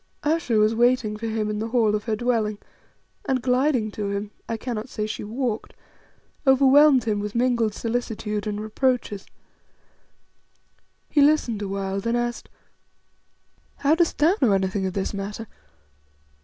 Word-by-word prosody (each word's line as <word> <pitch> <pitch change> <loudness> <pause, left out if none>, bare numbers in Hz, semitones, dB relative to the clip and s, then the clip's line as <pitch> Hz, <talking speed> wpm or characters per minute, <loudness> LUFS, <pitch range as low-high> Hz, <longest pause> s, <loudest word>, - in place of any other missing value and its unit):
Ayesha 300 -6 0
was 215 +1 +4
waiting 240 -2 +2
for 225 +2 -5
him 220 -1 -1
in 210 0 -2
the 220 - -2
hall 230 -3 +2
of 210 -1 -2
her 220 -2 0
dwelling, 220 -2 0 0.7
and 265 -2 +1
gliding 250 -3 +1
to 205 -1 -4
him 200 +1 -4 0.2
I 230 - -1
cannot 235 0 -5
say 215 -3 -3
she 215 - -5
walked 225 +1 -3 0.7
overwhelmed 270 0 +6
him 215 -2 -1
with 210 +1 -5
mingled 235 -3 +1
solicitude 225 -3 -3
and 210 0 -3
reproaches. 215 -1 -1 1.8
He 295 - +2
listened 280 -7 +3
awhile, 195 -1 -3
then 230 +4 -1
asked 240 0 -3 1.3
"How 285 +2 +2
dost 335 0 +1
thou 315 +4 +4
know 225 -6 +4
anything 190 0 0
of 185 - -4
this 195 +1 -2
matter? 205 +3 -5
225 Hz, 145 wpm, -24 LUFS, 210-255 Hz, 1.8 s, overwhelmed